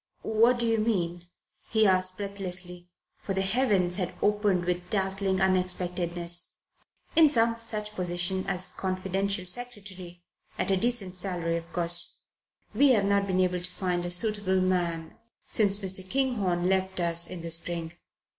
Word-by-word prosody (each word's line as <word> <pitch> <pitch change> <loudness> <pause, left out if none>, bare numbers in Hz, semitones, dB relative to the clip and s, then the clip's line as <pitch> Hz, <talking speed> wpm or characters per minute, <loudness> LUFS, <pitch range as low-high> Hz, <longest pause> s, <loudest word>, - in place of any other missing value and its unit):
"What 230 +3 +3
do 240 - -1
you 225 -1 +1
mean?" 175 -6 -1 0.4
he 220 -1 +3
asked 185 -1 +2
breathlessly, 185 -3 -4 0.3
for 195 - -4
the 190 - +1
heavens 195 -4 +2
had 180 -3 -3
opened 205 -4 +1
with 180 0 -3
dazzling 195 -1 -1
unexpectedness. 180 -2 0 0.6
"In 320 -2 +7
some 230 -3 +3
such 215 -2 -1
position 180 0 -1
as 185 -1 0
confidential 190 +1 -2
secretary 190 -5 -2 0.3
at - - 0
a - - +4
decent 195 -3 0
salary, 175 -3 -2
of 170 0 -6
course. 175 0 0 0.6
We've 255 -8 +4
not 200 0 +1
been 185 -1 +1
able 180 -1 0
to 180 +1 -4
find 180 -1 -2
a 175 - -4
suitable 190 0 +2
man 175 -3 -2 0.3
since 200 -2 +3
Mr. 190 -2 -2
Kinghorne 205 -10 0
left 190 0 0
us 170 -1 +2
in 180 -2 -7
the 165 - -5
spring. 165 0 -3
185 Hz, 145 wpm, -27 LUFS, 175-205 Hz, 0.6 s, In